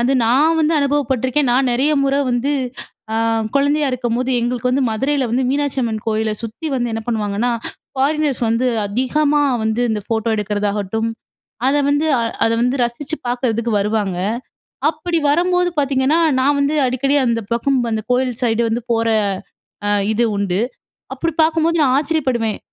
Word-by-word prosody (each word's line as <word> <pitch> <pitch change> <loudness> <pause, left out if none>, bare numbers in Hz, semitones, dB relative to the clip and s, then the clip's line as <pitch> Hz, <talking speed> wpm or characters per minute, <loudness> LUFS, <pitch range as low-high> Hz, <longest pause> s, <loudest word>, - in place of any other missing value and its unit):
அது 245 +3 +2
நான் 290 +8 +3
வந்து 310 +1 +2
அனுபவப்பட்டுருக்கேன். 275 -1 +1
நான் 260 +1 +2
நிறைய 275 +5 +2
முற 275 0 +1 0.2
வந்து 245 +4 0 0.6
அ - - -1 0.4
குழந்தையா 285 +1 +2
இருக்கும்போது, 250 0 -1
எங்களுக்கு 245 +1 -1
வந்து 270 +2 +1
மதுரையில 270 +5 0
வந்து 255 +3 +1
மீனாட்சி 285 0 -1
அம்மன் 220 -3 -2
கோயில 220 0 0
சுத்தி 230 +8 -6
வந்து 240 -2 -1
என்ன 225 - -2
பண்ணுவாங்கன்னா, 220 0 -1 0.4
ஃபாரினர்ஸ் 285 -1 0
வந்து 230 +3 +1 0.2
அதிகமா 285 +7 +1 0.2
வந்து 220 +2 0
இந்த 215 -1 -1
ஃபோட்டோ 225 0 -1
எடுக்கிறதாகட்டும், 210 +1 -1 0.6
அத 275 - +3
வந்து, 290 +2 +2
அ - - 0 0.2
அத - - +1
வந்து 250 +2 +1
ரசிச்சு 270 +6 -3
பார்க்கறதுக்கு 235 -2 -1
வருவாங்க. 205 -2 -1 0.7
அப்பிடி 330 +2 -2
வரும்போது 360 +3 +2
பார்த்தீங்கன்னா, 275 +2 +2 0.2
நான் 285 +2 +3
வந்து 285 +2 +1
அடிக்கடி 275 +3 +1
அந்த 230 -1 +1
பக்கம் 260 +3 +1
அந்த 220 -1 -2
கோவில் 255 0 +1
சைடு 235 -1 +2
வந்து 235 +2 -1
போற, 230 0 +1 0.8
அ - - +1 0.2
இது 235 +2 +2
உண்டு. 200 0 0 0.5
அப்பிடி 330 -2 -2
பார்க்கும்போது, 325 +1 +2
நான் 260 -1 +3
ஆச்சரியப்படுவேன். 260 -8 -1
255 Hz, 150 wpm, -19 LUFS, 225-285 Hz, 0.8 s, நான்